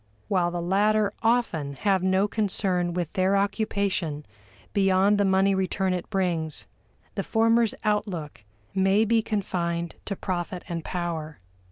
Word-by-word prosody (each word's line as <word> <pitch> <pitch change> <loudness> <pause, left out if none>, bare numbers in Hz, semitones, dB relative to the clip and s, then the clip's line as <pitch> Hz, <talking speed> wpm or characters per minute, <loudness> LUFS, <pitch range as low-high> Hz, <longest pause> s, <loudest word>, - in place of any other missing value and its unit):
While 180 -3 +2
the 175 -1 -3
latter 205 +3 +2
often 225 -12 +1
have 195 +3 +1
no 190 +2 +2
concern 185 -4 0
with 175 -3 -2
their 190 0 +2
occupation 200 -6 -1 0.5
beyond 195 +1 +3
the 205 - +3
money 195 +1 +3
return 190 0 0
it 180 -1 -4
brings, 170 -6 -1 0.5
the - - -2
former's 230 0 +2
outlook 190 - -2 0.3
may 195 +3 +3
be 225 +1 +3
confined 170 -5 -2
to 200 - -3
profit 180 -1 -4
and 170 -2 -4
power. 165 -4 -4
190 Hz, 135 wpm, -26 LUFS, 175-205 Hz, 0.5 s, beyond